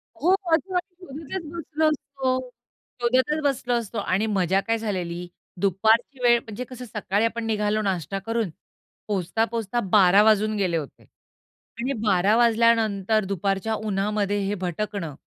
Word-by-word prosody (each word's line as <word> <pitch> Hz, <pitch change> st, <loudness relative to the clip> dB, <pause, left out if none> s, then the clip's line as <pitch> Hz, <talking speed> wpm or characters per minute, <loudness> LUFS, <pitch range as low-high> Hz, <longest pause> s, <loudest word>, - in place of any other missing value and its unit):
हो. 345 Hz, +11 st, +3 dB
शोधत 340 Hz, -5 st, +1 dB, 0.5 s
मग 295 Hz, 0 st, -9 dB
तर 380 Hz, -, -2 dB
बसलो 315 Hz, -1 st, -1 dB
असतो. 265 Hz, -3 st, -2 dB, 0.5 s
शोधतच 260 Hz, +6 st, +2 dB
बसलो 260 Hz, -3 st, 0 dB
असतो 230 Hz, -1 st, -2 dB
आणि 200 Hz, +1 st, 0 dB
मजा 190 Hz, -2 st, +2 dB
काय 230 Hz, 0 st, +2 dB
झालेली 180 Hz, -5 st, -4 dB, 0.3 s
दुपारची 220 Hz, +7 st, +2 dB
वेळ 240 Hz, -1 st, +5 dB
म्हणजे 230 Hz, +2 st, -7 dB
कसं 250 Hz, -1 st, -8 dB
सकाळी 210 Hz, -1 st, -1 dB
आपण 230 Hz, 0 st, -2 dB
निघालो 215 Hz, -1 st, 0 dB
नाश्ता 195 Hz, -2 st, -2 dB
करून. 225 Hz, -4 st, -1 dB, 0.6 s
पोहचता, 205 Hz, +2 st, 0 dB
पोहचता 230 Hz, 0 st, -2 dB
12:00 195 Hz, 0 st, +6 dB
वाजून 215 Hz, 0 st, +3 dB
गेले 185 Hz, -4 st, +1 dB
होते. 150 Hz, -4 st, -7 dB, 0.8 s
आणि 255 Hz, +4 st, -1 dB
12:00 200 Hz, +1 st, +3 dB
वाजल्यानंतर 225 Hz, -3 st, +3 dB
दुपारच्या 195 Hz, +3 st, -1 dB
उन्हामध्ये 205 Hz, -1 st, -1 dB
हे 200 Hz, +1 st, -1 dB
भटकणं 175 Hz, -4 st, -3 dB
215 Hz, 135 wpm, -24 LUFS, 195-240 Hz, 0.8 s, 12:00